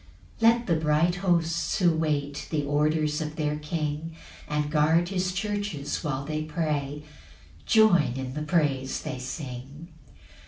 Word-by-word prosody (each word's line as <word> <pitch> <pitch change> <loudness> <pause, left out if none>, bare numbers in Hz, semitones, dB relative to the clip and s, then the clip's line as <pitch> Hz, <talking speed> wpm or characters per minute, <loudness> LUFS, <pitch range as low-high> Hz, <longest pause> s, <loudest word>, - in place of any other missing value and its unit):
3 225 0 +7
Let 235 +1 +1
the 170 - +2
bright 160 +3 +2
hosts 170 -3 +1
who 175 -3 +4
wait 150 -3 -1
The 150 -2 0
orders 150 +1 +1
of 155 0 -4
their 150 -1 -1
King, 150 +1 -3 0.3
And 150 0 -1
guard 160 +3 +3
his 185 -1 0
churches 195 -8 -3
when 140 -3 -2
they 155 +1 -2
pray, 150 -2 -2 0.6
Join 185 - +5
in 130 -1 -4
the 150 - -4
praise 145 -4 0
they 130 - -4
sing. 135 +4 -7
155 Hz, 145 wpm, -27 LUFS, 145-170 Hz, 0.6 s, 3